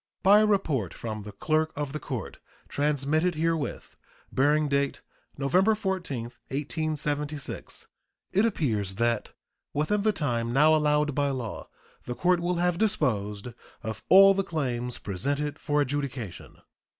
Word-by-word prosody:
By 200 Hz, +2 st, +7 dB
a 215 Hz, -, +4 dB
report 150 Hz, -, 0 dB
from 110 Hz, -2 st, -5 dB
the 105 Hz, +1 st, -8 dB
clerk 155 Hz, +9 st, 0 dB
of 145 Hz, -1 st, -3 dB
the 150 Hz, -, -3 dB
court, 125 Hz, -9 st, -6 dB, 0.3 s
transmitted 150 Hz, +4 st, +1 dB
herewith, 160 Hz, -1 st, -2 dB, 0.3 s
bearing 150 Hz, +3 st, +3 dB
date 140 Hz, 0 st, 0 dB, 0.4 s
November 185 Hz, +10 st, +3 dB
14, 185 Hz, -, -2 dB, 0.2 s
1876, 150 Hz, 0 st, -3 dB, 0.5 s
it 200 Hz, -, +4 dB
appears 110 Hz, -, 0 dB
that 115 Hz, 0 st, 0 dB, 0.4 s
within 175 Hz, +8 st, +1 dB
the 215 Hz, +1 st, +3 dB
time 120 Hz, -, -1 dB
now 150 Hz, +5 st, +5 dB
allowed 150 Hz, -1 st, +2 dB
by 145 Hz, +1 st, +1 dB
law 125 Hz, -5 st, -5 dB, 0.4 s
the 120 Hz, -, -4 dB
court 180 Hz, +3 st, +2 dB
will 175 Hz, +1 st, 0 dB
have 175 Hz, 0 st, +1 dB
disposed 115 Hz, -, 0 dB, 0.3 s
of 110 Hz, 0 st, -5 dB
all 195 Hz, +1 st, +9 dB
the 195 Hz, 0 st, 0 dB
claims 125 Hz, -8 st, -2 dB
presented 140 Hz, +10 st, -2 dB
for 150 Hz, -1 st, +1 dB
adjudication. 135 Hz, -, -4 dB
145 Hz, 135 wpm, -27 LUFS, 125-165 Hz, 0.5 s, all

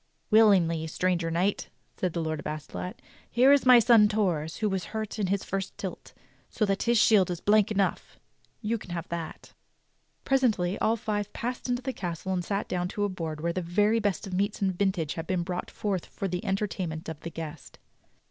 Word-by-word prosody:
"Willingly, 180 Hz, -7 st, +5 dB
stranger 175 Hz, 0 st, 0 dB
knight," 180 Hz, +5 st, 0 dB, 0.3 s
said 180 Hz, -3 st, -2 dB
the 170 Hz, -, -1 dB
Lord 155 Hz, -1 st, -2 dB
of -, -, -6 dB
Astolat. 155 Hz, +4 st, -6 dB, 0.3 s
"Here 255 Hz, +4 st, +5 dB
is 280 Hz, -2 st, +3 dB
my 250 Hz, -1 st, +9 dB
son 230 Hz, -2 st, +6 dB
Torre's 175 Hz, -7 st, 0 dB
who 215 Hz, -, 0 dB
was 190 Hz, -2 st, -2 dB
hurt 220 Hz, 0 st, -4 dB
in 200 Hz, -, +1 dB
his 195 Hz, +1 st, 0 dB
first 195 Hz, 0 st, -4 dB
tilt, 190 Hz, -, -7 dB, 0.4 s
so 215 Hz, -, 0 dB
that 195 Hz, -1 st, 0 dB
his 235 Hz, 0 st, +3 dB
shield 210 Hz, -4 st, +5 dB
is 175 Hz, -2 st, -3 dB
blank 210 Hz, +1 st, +3 dB
enough. 200 Hz, -2 st, -1 dB, 0.4 s
You 225 Hz, +2 st, 0 dB
can -, -, -12 dB
have 170 Hz, -1 st, -4 dB
that." 170 Hz, -1 st, -6 dB, 0.7 s
Presently 220 Hz, -9 st, +2 dB
all 225 Hz, -, +2 dB
five 210 Hz, -2 st, -3 dB
passed 250 Hz, +2 st, -4 dB
into 245 Hz, 0 st, -1 dB
the 265 Hz, -, -2 dB
castle 180 Hz, 0 st, -4 dB
and 180 Hz, -1 st, -1 dB
sat 200 Hz, +3 st, -2 dB
down 180 Hz, -1 st, -1 dB
to 205 Hz, +3 st, -3 dB
a 205 Hz, -, +1 dB
board 160 Hz, -5 st, -5 dB
where 170 Hz, +1 st, -1 dB
the 185 Hz, -, -2 dB
very 205 Hz, +6 st, +2 dB
best 205 Hz, -5 st, -1 dB
of 190 Hz, -, -7 dB
meats 200 Hz, +3 st, 0 dB
and 190 Hz, -2 st, 0 dB
vintage 185 Hz, -5 st, 0 dB
had 165 Hz, 0 st, -6 dB
been 180 Hz, -2 st, 0 dB
brought 180 Hz, 0 st, -4 dB
forth 195 Hz, -4 st, -3 dB
for 195 Hz, -, -4 dB
the 180 Hz, -1 st, -3 dB
entertainment 185 Hz, -5 st, -2 dB
of 160 Hz, -2 st, -6 dB
the 170 Hz, -, -6 dB
guest. 160 Hz, -3 st, -8 dB
190 Hz, 205 wpm, -28 LUFS, 170-210 Hz, 0.7 s, my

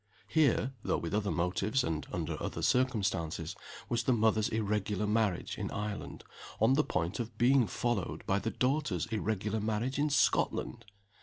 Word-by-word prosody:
Here 135 Hz, -4 st, +2 dB
(though -, -, 0 dB
with 85 Hz, +2 st, -4 dB
other 105 Hz, -1 st, +1 dB
motives, 100 Hz, +8 st, 0 dB
and 80 Hz, -2 st, -2 dB
under -, -, -2 dB
other -, -, -3 dB
circumstances) 105 Hz, -10 st, 0 dB, 0.3 s
was 120 Hz, -1 st, 0 dB
the 130 Hz, -, +2 dB
mother's 110 Hz, -1 st, +2 dB
irregular 105 Hz, -2 st, -1 dB
marriage 105 Hz, -4 st, 0 dB
in -, -, -2 dB
Ireland, 105 Hz, 0 st, -5 dB, 0.4 s
on 130 Hz, -, +5 dB
the 150 Hz, +2 st, +4 dB
point 90 Hz, -, -2 dB
of 115 Hz, -2 st, -5 dB
being 125 Hz, 0 st, +4 dB
followed 110 Hz, 0 st, -2 dB
by 100 Hz, 0 st, +1 dB
the 115 Hz, -, -2 dB
daughter's 130 Hz, -, 0 dB
irregular 110 Hz, 0 st, -1 dB
marriage 110 Hz, +6 st, -1 dB
in 150 Hz, +1 st, +2 dB
Scotland! 120 Hz, -4 st, +1 dB
110 Hz, 155 wpm, -32 LUFS, 100-120 Hz, 0.4 s, on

